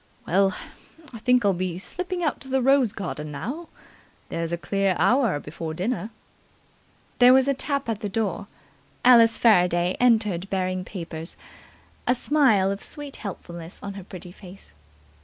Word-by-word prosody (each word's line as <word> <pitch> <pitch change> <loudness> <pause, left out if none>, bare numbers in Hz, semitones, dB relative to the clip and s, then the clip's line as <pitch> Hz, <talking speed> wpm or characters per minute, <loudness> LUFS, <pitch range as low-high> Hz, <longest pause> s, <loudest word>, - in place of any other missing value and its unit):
Well, 190 +1 +2 0.6
I 230 - -8
think 250 0 +3
I'll 200 - +4
be 180 -1 -3
slipping 360 - -4
out 305 - -1
to 265 - -11
the 265 0 +1
rose 270 -4 +4
garden 180 -7 -5
again - - -8
now. 315 - -5 0.6
There's 165 0 -3
a 170 - -1
clear 195 +1 0
hour 240 - +2
before 160 +2 -6
dinner." 215 +5 -2 1.1
There 250 +1 +8
was 265 0 +4
a 280 - +3
tap 280 0 -3
at 225 -3 -2
the 205 - -4
door. 205 -2 -2 0.6
Alice 230 -2 +7
Faraday 180 -5 +3
entered 210 -7 +2
bearing 185 -1 -1
papers, 165 -3 -7 0.7
a 250 - +4
smile 235 -9 +3
of 200 - -5
sweet 290 -2 -7
helpfulness 170 -4 -8
on 200 -1 -5
her 195 -1 -8
pretty 180 -1 -10
face. 180 - -14
200 Hz, 160 wpm, -24 LUFS, 180-250 Hz, 1.1 s, There